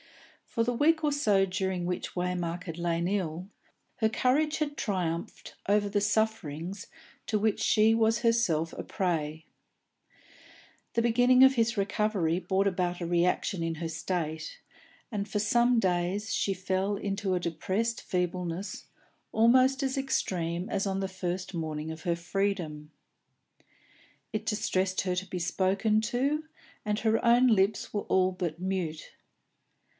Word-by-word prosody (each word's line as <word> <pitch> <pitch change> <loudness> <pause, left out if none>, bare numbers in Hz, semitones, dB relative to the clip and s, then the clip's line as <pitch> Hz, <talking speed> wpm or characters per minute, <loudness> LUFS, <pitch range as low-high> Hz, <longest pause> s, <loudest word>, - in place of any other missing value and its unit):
For 230 - 0
the 245 - 0
week 315 +6 +3
or 300 - +2
so 205 -9 +3
during 190 -1 -2
which 180 0 -3
Waymark 180 -1 -2
had 165 -1 -6
lain 170 0 0
ill, 180 -3 -2 0.5
her 220 -4 +2
courage 285 +7 +1
had 295 -2 -2
triumphed 175 -7 -3 0.2
over 205 0 +3
the 205 0 0
sufferings 200 -4 -1 0.4
to 215 - +1
which 215 0 +1
she 220 +1 +4
was 225 0 +3
herself 230 -9 +1
a - - -6
prey; 160 -5 -2 1.5
the 230 - +1
beginning 245 +2 +5
of 265 0 +7
his 230 -2 +1
recovery 200 -4 0
brought 190 +2 +1
about 180 -2 -1
a 175 - -3
reaction 175 +1 +1
in 165 0 -2
her 165 +1 -4
state, 165 - -4 0.5
and 205 -4 -3
for 210 - -1
some 235 +3 +3
days 185 +3 0
she 195 - +1
fell 190 +2 -1
into 195 -1 -2
a - - +1
depressed 190 +7 -2
feebleness 180 +1 -3 0.4
almost 255 +4 +4
as 265 +1 -1
extreme 180 -9 -1
as 200 -3 -1
on 195 -1 -1
the 195 - -1
first 185 0 -4
morning 160 -2 -3
of 160 0 -8
her 170 -3 0
freedom. 170 -4 -2 1.4
It 215 0 -3
distressed 195 -4 0
her 185 -2 -1
to 185 +1 -2
be 180 0 -4
spoken 195 +5 +1
to, 280 +6 0 0.4
and 210 0 -1
her 225 0 +1
own 240 +2 +5
lips 205 -2 +2
were 205 - 0
all 185 -1 +2
but 175 -3 -4
mute. 180 -4 -3
195 Hz, 145 wpm, -29 LUFS, 175-220 Hz, 1.5 s, of